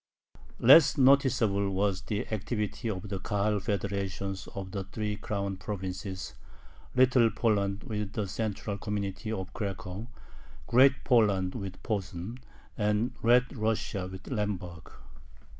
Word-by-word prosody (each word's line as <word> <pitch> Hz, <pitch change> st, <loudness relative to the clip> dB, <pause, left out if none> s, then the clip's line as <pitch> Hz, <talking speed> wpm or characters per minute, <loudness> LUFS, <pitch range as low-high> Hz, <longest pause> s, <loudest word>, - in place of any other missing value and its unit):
Less 135 Hz, +5 st, +7 dB
noticeable 125 Hz, -7 st, +4 dB
was 95 Hz, 0 st, 0 dB
the 105 Hz, -2 st, -3 dB
activity 110 Hz, +1 st, -2 dB
of 105 Hz, 0 st, -4 dB
the 95 Hz, -1 st, -3 dB
Kahal 105 Hz, +2 st, 0 dB
federations 100 Hz, -2 st, -3 dB
of 95 Hz, -1 st, -5 dB
the 95 Hz, -1 st, -4 dB
three 105 Hz, +1 st, -3 dB
"Crown 100 Hz, -2 st, -3 dB
provinces": 95 Hz, -1 st, -5 dB, 0.6 s
Little 125 Hz, -2 st, +5 dB
Poland 105 Hz, -2 st, 0 dB
with 105 Hz, -5 st, -4 dB
the 105 Hz, -3 st, -2 dB
central 105 Hz, 0 st, -3 dB
community 105 Hz, 0 st, -3 dB
of 95 Hz, -4 st, -4 dB
Cracow, 100 Hz, 0 st, -5 dB, 0.6 s
Great 130 Hz, +2 st, +5 dB
Poland 100 Hz, -7 st, +3 dB
with 100 Hz, -5 st, -7 dB
Posen, 100 Hz, +2 st, -4 dB, 0.4 s
and 105 Hz, +2 st, +1 dB
Red 125 Hz, +3 st, +4 dB
Russia 105 Hz, -4 st, -1 dB
with 95 Hz, +1 st, -9 dB
Lemberg. 100 Hz, -, -4 dB
105 Hz, 120 wpm, -29 LUFS, 95-115 Hz, 0.6 s, Less